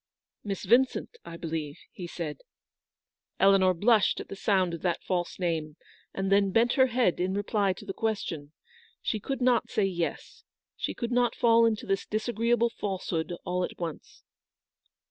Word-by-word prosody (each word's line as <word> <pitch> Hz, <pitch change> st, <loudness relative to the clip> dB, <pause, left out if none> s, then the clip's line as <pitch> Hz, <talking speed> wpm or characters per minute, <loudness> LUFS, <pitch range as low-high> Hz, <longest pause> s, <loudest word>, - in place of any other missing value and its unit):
" -, -, -61 dB
Miss 200 Hz, -3 st, -4 dB
Vincent, 260 Hz, -, +2 dB
I 170 Hz, -, -8 dB
believe? 160 Hz, -3 st, -4 dB
" -, -, -58 dB
he 175 Hz, -, -4 dB
said. 155 Hz, -4 st, -5 dB, 1.0 s
Eleanor 190 Hz, -1 st, +5 dB
blushed 210 Hz, +3 st, +3 dB
at -, -, -8 dB
the -, -, -6 dB
sound 190 Hz, -3 st, +1 dB
of 165 Hz, -, -5 dB
that 175 Hz, -2 st, -1 dB
false 175 Hz, -2 st, -2 dB
name, 160 Hz, -4 st, -2 dB, 0.4 s
and 195 Hz, 0 st, -2 dB
then 200 Hz, 0 st, +4 dB
bent 230 Hz, +5 st, +3 dB
her 260 Hz, -1 st, +5 dB
head 240 Hz, -7 st, +1 dB
in 185 Hz, +2 st, 0 dB
reply 205 Hz, -1 st, +1 dB
to -, -, -12 dB
the 195 Hz, -, -4 dB
question. 175 Hz, -10 st, -3 dB, 0.5 s
She 215 Hz, -, -1 dB
could 270 Hz, +6 st, -4 dB
not 245 Hz, -2 st, +3 dB
say 210 Hz, -, +1 dB
yes. 175 Hz, -3 st, -4 dB, 0.3 s
She -, -, -3 dB
could 235 Hz, -1 st, -3 dB
not 245 Hz, -1 st, +2 dB
fall 230 Hz, -1 st, +5 dB
into 220 Hz, -2 st, -1 dB
this 195 Hz, 0 st, -1 dB
disagreeable 230 Hz, +2 st, +1 dB
falsehood 185 Hz, -6 st, -3 dB
all 180 Hz, 0 st, -1 dB
at -, -, -5 dB
once. 165 Hz, -3 st, -7 dB
195 Hz, 170 wpm, -28 LUFS, 175-230 Hz, 1.0 s, Eleanor